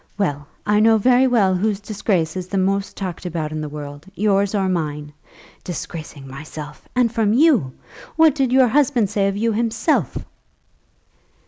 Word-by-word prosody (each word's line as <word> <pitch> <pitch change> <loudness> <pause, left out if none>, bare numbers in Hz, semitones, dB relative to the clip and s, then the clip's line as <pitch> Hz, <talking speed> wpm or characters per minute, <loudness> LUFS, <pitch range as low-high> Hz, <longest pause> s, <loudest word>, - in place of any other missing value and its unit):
Well, 145 -8 -2 0.2
I 210 0 +3
know 225 +1 +5
very 250 +4 +4
well 210 -7 +3
whose 200 +2 0
disgrace 200 -6 -1
is 185 -1 -4
the 195 - -3
most 195 +1 0
talked 185 -4 -5
about 165 -4 -3
in 155 0 -4
the 150 - -5
world, 145 +2 -8
yours 200 -1 +1
or 195 -2 +1
mine. 150 -4 -3 0.5
Disgracing 155 -5 -7
myself; 150 +2 -9
and 240 -2 +2
from 220 -3 +2
you? 255 - +4 0.4
What 320 -2 +5
did 270 -4 0
your 260 -1 +5
husband 245 -6 +2
say 200 -2 +1
of 195 0 -2
you 230 +2 +1
himself?" 225 +1 0
195 Hz, 160 wpm, -20 LUFS, 160-225 Hz, 0.5 s, know